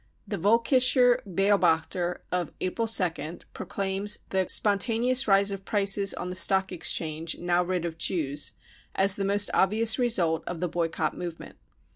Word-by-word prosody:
The 205 - -4
Volk 225 +6 +2
ischer 255 -1 +4
Beobachter 180 -2 +1
of 180 -3 -1
April 225 +5 -2
2nd, 170 -6 -1
proclaims 195 +1 -2
the 190 -1 0
" - - -12
spontaneous 230 +5 +1
rise 200 0 +3
of 195 -1 -6
prices 200 -1 +1
on 180 - -5
the - - -6
Stock 190 +1 +3
Exchange, 160 -2 -2
now 175 0 0
rid 180 -1 -3
of 165 -1 -6
Jews," 150 -5 -2 0.4
as 195 0 +5
the 200 - -3
most 200 +1 +1
obvious 220 +5 +3
result 180 -10 0
of 175 -2 -5
the 180 - -1
boycott 170 -1 -2
movement. 175 -2 -8
190 Hz, 155 wpm, -26 LUFS, 175-205 Hz, 0.4 s, as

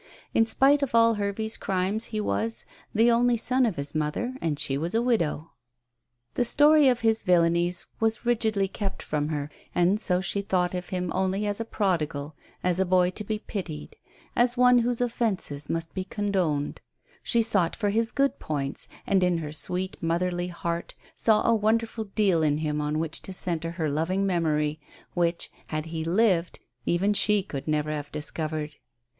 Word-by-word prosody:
In 225 - +3
spite 280 +5 +4
of 270 -4 -1
all 230 0 +6
Hervey's 210 +1 -2
crimes 195 +4 -1
he 215 - -4
was 225 +2 -2 0.3
"the 230 +2 +4
only 240 +1 +3
son 250 +2 +2
of 210 - -2
his 140 0 -4
mother, 155 +11 -2
and 155 -3 -1
she 135 - -1
was 165 +8 -2
a 230 - +3
widow." 170 -10 0 0.8
The - - +1
story 295 +3 +6
of 250 -2 +2
his 225 -1 +2
villainies 175 -1 +2
was 225 +1 0
rigidly 220 -4 +1
kept 200 0 -5
from 150 -1 -1
her, 150 -1 -3 0.2
and 180 +4 +3
so 180 -4 +2
she 190 +2 -2
thought 180 -2 0
of 180 0 -4
him 180 -3 -2
only 190 +2 0
as 205 0 -2
a 230 - -2
prodigal, 160 -9 -1 0.3
as 180 0 +2
a - - +4
boy 180 0 +3
to 210 - -5
be 215 +1 -2
pitied, 180 - -6 0.4
as 240 +1 +3
one 250 0 +6
whose 240 0 0
offences 210 -12 -1
must 165 0 -3
be 190 - -3
condoned; 185 -8 -1 0.4
she 235 -2 +2
sought 195 -7 +1
for 205 -2 0
his 225 +2 +1
good 275 0 +1
points, 140 -3 -4 0.2
and, 190 -2 +2
in 180 -1 +2
her 155 -3 -5
sweet 180 +5 -1
motherly 175 +1 0
heart, 170 -1 -4 0.2
saw 215 -2 +3
a 230 - +5
wonderful 225 +1 0
deal 195 -7 +3
in 150 -1 +2
him 150 -1 -1
on 150 +1 -1
which 160 0 -2
to - - -7
centre 170 -2 -3
her 165 -3 -2
loving 165 +7 0
memory, 155 -4 0 0.3
which, 170 -1 -1 0.2
had 155 0 -3
he 160 -1 -4
lived, 180 0 +2 0.3
even 195 +4 +2
she 205 0 +2
could 140 -7 -7
never 150 0 0
have 145 -1 -5
discovered. 150 0 -3
185 Hz, 180 wpm, -26 LUFS, 160-220 Hz, 0.8 s, all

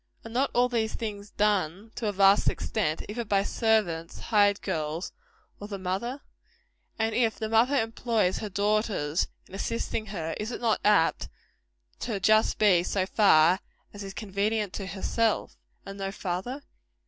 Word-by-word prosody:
Are 225 - -8
not 265 +4 +1
all 245 +1 +4
these 230 -3 -1
things 205 -2 -5
done, 205 -1 0
to 225 - -3
a - - +1
vast 195 0 +5
extent, 165 -8 -2
either 235 +3 -4
by 200 -2 +1
servants, 200 -8 0
hired 205 -2 +3
girls, 160 -2 -3 0.5
or 205 - -7
the 200 -2 -5
mother? 195 +9 -3 0.8
And 225 0 0
if 230 -2 +2
the 220 - -3
mother 230 +6 +3
employs 225 -3 0
her 215 - -5
daughters 200 -6 0 0.2
in - - -19
assisting 215 +2 -3
her, 165 -5 -4
is 215 +3 -3
it - - -5
not 230 -3 +1
apt 205 -6 +3 0.7
to 235 - -3
be 200 - -2
just 215 +3 +3 0.3
so 190 -2 0
far 185 -3 +5 0.3
as 205 0 -8
is 195 0 -8
convenient 205 0 -1
to 195 - -5
herself, 215 +3 -1 0.3
and 195 0 -8
no 195 0 -3
farther? 195 +9 -4
205 Hz, 160 wpm, -27 LUFS, 190-225 Hz, 0.8 s, vast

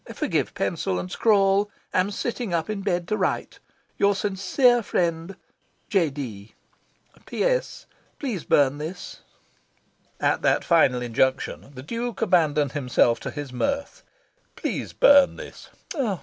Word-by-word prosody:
Forgive - - -1
pencil 90 - -1
and 90 0 -5
scrawl. 200 -2 +3 0.2
Am 185 +2 +2
sitting 225 -2 -3
up 165 +5 -2
in 205 -2 -4
bed 175 -3 -1
to 215 - +1
write. 190 -3 -2 0.4
Your 200 0 +3
sincere 215 +6 +2
friend, 170 -2 -2 0.6
"Z. 175 -6 +3
D. 115 -8 -8 0.7
"P.S. - - -1 0.3
Please 230 - -4
burn 145 0 +2
this." 165 +4 -7 1.0
At - - +1
that - - +2
final 125 -1 +3
injunction, 130 +3 -1
the 130 - -8
Duke 235 - -3
abandoned 155 - +2
himself 125 -4 +2
to - - -5
his 145 -4 -7
mirth. 280 - -2 0.5
"Please - - -4
burn 280 -1 +5
this." - - -11
180 Hz, 125 wpm, -24 LUFS, 140-215 Hz, 1.0 s, burn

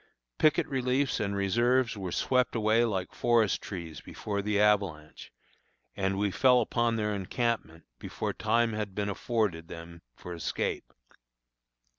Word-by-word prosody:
Picket 155 -1 +3
reliefs 130 0 0
and 100 -1 -1
reserves 120 +5 +2
were 95 -3 -5
swept 125 +5 +1
away 110 +1 +3
like 95 -5 -2
forest 115 -4 +2
trees 85 -5 -7
before 100 -1 -4
the 105 0 0
avalanche, 100 -8 0 0.6
and 95 0 -1
we 100 0 +1
fell 125 +4 +5
upon 120 0 +1
their 105 -1 -1
encampment 100 -4 -2 0.2
before - - -4
time 115 -1 +1
had 105 -3 -4
been 105 -1 -1
afforded 100 -6 -1
them 85 0 -10
for 90 - -8
escape. 85 - -3
105 Hz, 135 wpm, -29 LUFS, 95-120 Hz, 0.6 s, fell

